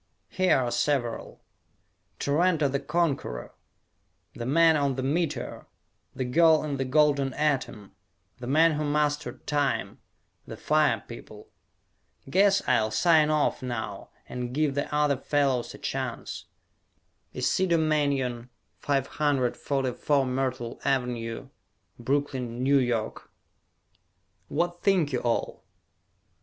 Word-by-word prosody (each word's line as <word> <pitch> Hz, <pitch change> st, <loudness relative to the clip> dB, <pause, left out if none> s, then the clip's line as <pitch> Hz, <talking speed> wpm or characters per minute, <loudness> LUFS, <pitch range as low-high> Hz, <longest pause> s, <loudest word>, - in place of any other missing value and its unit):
Here 185 Hz, -4 st, +2 dB
are 125 Hz, -2 st, -1 dB
several: 120 Hz, -1 st, -2 dB, 0.7 s
"Tarranto 155 Hz, +1 st, +2 dB
the 140 Hz, +1 st, -1 dB
Conqueror," 140 Hz, -, -2 dB, 0.8 s
"The 120 Hz, -, -6 dB
Man 165 Hz, +3 st, +5 dB
on 140 Hz, -3 st, +1 dB
the 130 Hz, -, -3 dB
Meteor," 150 Hz, -1 st, -2 dB, 0.5 s
"The 130 Hz, -, -2 dB
Girl 160 Hz, +4 st, +4 dB
in 145 Hz, -2 st, -3 dB
the 135 Hz, -, -1 dB
Golden 140 Hz, -1 st, +2 dB
Atom," 135 Hz, -9 st, -1 dB, 0.5 s
"The 120 Hz, -, -7 dB
Man 160 Hz, +5 st, +4 dB
Who 155 Hz, 0 st, -2 dB
Mastered 150 Hz, 0 st, -1 dB
Time," 145 Hz, -3 st, -1 dB, 0.5 s
"The -, -, -8 dB
Fire -, -, +2 dB
People." -, -, -11 dB, 0.8 s
Guess 195 Hz, +7 st, +3 dB
I'll 110 Hz, -4 st, +2 dB
sign 155 Hz, +7 st, +4 dB
off 155 Hz, -1 st, +1 dB
now 110 Hz, -5 st, -5 dB, 0.2 s
and 125 Hz, 0 st, -5 dB
give 150 Hz, -2 st, +1 dB
the 145 Hz, +1 st, -3 dB
other 150 Hz, -2 st, +2 dB
fellows 135 Hz, -3 st, 0 dB
a -, -, -11 dB
chance. -, -, -5 dB, 0.9 s
Isidore 185 Hz, -3 st, +1 dB
Manyon, 140 Hz, -6 st, 0 dB, 0.3 s
544 135 Hz, -1 st, 0 dB
Myrtle 125 Hz, -2 st, -3 dB
Ave., 125 Hz, -4 st, -2 dB, 0.5 s
Brooklyn, 130 Hz, -2 st, -2 dB
N. 140 Hz, -, +3 dB
Y. 120 Hz, -5 st, +2 dB, 1.4 s
_What 175 Hz, +2 st, -1 dB
Think 180 Hz, -8 st, +2 dB
You 125 Hz, -, +1 dB
All? 120 Hz, -1 st, -2 dB
140 Hz, 110 wpm, -27 LUFS, 125-150 Hz, 1.4 s, Man